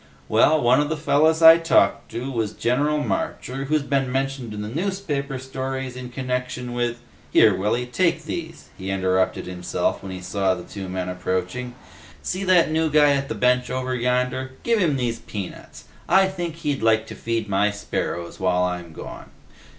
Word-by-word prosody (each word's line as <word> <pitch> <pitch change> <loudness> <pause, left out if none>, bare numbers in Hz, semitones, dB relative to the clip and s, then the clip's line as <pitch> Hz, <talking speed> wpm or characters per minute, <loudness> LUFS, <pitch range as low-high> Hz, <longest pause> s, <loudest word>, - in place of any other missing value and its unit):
Well, 155 +1 +4
one 125 +1 +4
of 150 - -1
the 160 - -1
fellas 160 +2 +3
I 165 +1 +10
talked 165 0 +2
to 125 +3 -4
was 110 -4 -2
General 145 +5 +1
Marcher, 135 -1 -3
who's 150 +1 +1
been 135 -2 0
mentioned 135 -3 -2
in 105 0 -5
the - - -5
newspaper 150 - -2
stories 130 0 -4
in 125 -1 -7
connection 125 -1 -3
with... 120 -1 -1 0.3
here, 105 -4 +6
Willy, 105 +6 0
take 165 +8 +1
these," 165 -1 -6
he 95 +1 -5
interrupted 95 -1 0
himself 90 -1 -2
when 95 - -7
he 90 - -6
saw 95 +1 0
the 90 - -8
two 95 0 -7
men 90 0 -3
approaching. 95 +7 -3 0.5
"See 185 +2 -2
that 180 -4 +4
new 160 0 +1
guy 150 -1 +5
at 140 0 0
the - - -2
bench 125 0 +2
over 130 0 -2
yonder? 125 +1 -1
Give 230 -2 +2
him 165 -7 +2
these 120 -2 -1
peanuts. 100 -4 -8 0.3
I 190 +1 +5
think 175 -4 -4
he'd 150 -6 -2
like 110 0 +3
to - - -9
feed 115 -1 -2
my 100 +1 +2
sparrows 100 -4 -4
while 90 -1 +2
I'm 90 -2 -3
gone. - - -9
125 Hz, 180 wpm, -23 LUFS, 105-145 Hz, 0.5 s, I